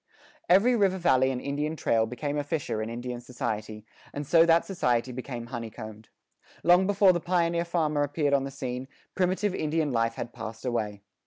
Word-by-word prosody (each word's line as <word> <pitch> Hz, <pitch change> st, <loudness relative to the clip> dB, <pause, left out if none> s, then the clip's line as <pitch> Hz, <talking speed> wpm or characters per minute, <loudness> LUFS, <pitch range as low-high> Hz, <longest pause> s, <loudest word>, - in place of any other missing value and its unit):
Every 205 Hz, +8 st, +5 dB
river 195 Hz, -4 st, +2 dB
valley 130 Hz, -7 st, +3 dB
and 130 Hz, -2 st, -2 dB
Indian 145 Hz, +4 st, -2 dB
trail 115 Hz, -6 st, +1 dB
became 145 Hz, +5 st, -4 dB
a 145 Hz, -, -1 dB
fissure 145 Hz, -7 st, -2 dB
in 110 Hz, -, -3 dB
Indian 120 Hz, +1 st, -5 dB
society, 110 Hz, -3 st, -5 dB, 0.3 s
and 145 Hz, +1 st, -5 dB
so 165 Hz, +3 st, +5 dB
that 165 Hz, 0 st, +4 dB
society 125 Hz, -10 st, 0 dB
became 125 Hz, -1 st, -6 dB
honeycombed. 110 Hz, -2 st, -8 dB, 0.5 s
Long 180 Hz, +2 st, +5 dB
before 200 Hz, -2 st, +5 dB
the 175 Hz, -, 0 dB
pioneer 170 Hz, -1 st, +1 dB
farmer 155 Hz, -4 st, 0 dB
appeared 145 Hz, 0 st, 0 dB
on 140 Hz, -1 st, +3 dB
the 135 Hz, -, -4 dB
scene, 130 Hz, -1 st, -5 dB, 0.3 s
primitive 185 Hz, +2 st, 0 dB
Indian 155 Hz, -3 st, 0 dB
life 115 Hz, -1 st, 0 dB
had 120 Hz, -, -6 dB
passed 110 Hz, 0 st, -8 dB
away. 105 Hz, -5 st, -2 dB
140 Hz, 175 wpm, -27 LUFS, 120-170 Hz, 0.5 s, Every